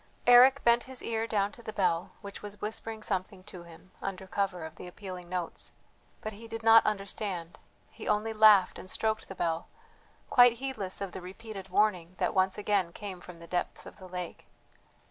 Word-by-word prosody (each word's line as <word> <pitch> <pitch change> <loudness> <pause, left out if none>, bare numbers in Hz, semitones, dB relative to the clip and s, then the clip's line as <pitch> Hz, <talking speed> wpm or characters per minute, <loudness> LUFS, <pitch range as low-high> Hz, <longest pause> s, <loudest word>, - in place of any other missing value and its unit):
Eric 255 +3 +7
bent 235 0 +4
his 260 -1 -4
ear 225 0 -1
down 205 -2 +1
to 235 - -13
the 225 - -6
bell, 185 -4 0
which 200 -2 -8
was 205 0 -8
whispering 220 +1 -4
something 190 -1 -3
to 185 -3 -10
him 170 +2 -15
under 190 -1 -5
cover 190 -3 -2
of 160 - -9
the 180 - -8
appealing 180 -1 -8
notes, 180 -2 -5 0.5
but 215 - -5
he 225 +3 -11
did 225 0 -6
not 225 0 +8
understand, 195 -4 -3 0.3
he - - -9
only 220 +2 +1
laughed 215 -3 +6
and 185 - -9
stroked 220 +2 -1
the 190 - -8
bell, 165 -2 -1 0.6
quite 245 -1 +7
heedless 230 -7 -4
of 195 -2 -3
the 190 - -7
repeated 195 +1 -9
warning 185 -3 +1
that - - 0
once 190 0 +2
again 200 -4 +1
came 190 -1 -7
from 180 -1 -11
the 170 - -11
depths 175 +1 -3
of - - -11
the 185 - -10
lake. 180 -1 -7
200 Hz, 190 wpm, -30 LUFS, 180-220 Hz, 0.6 s, not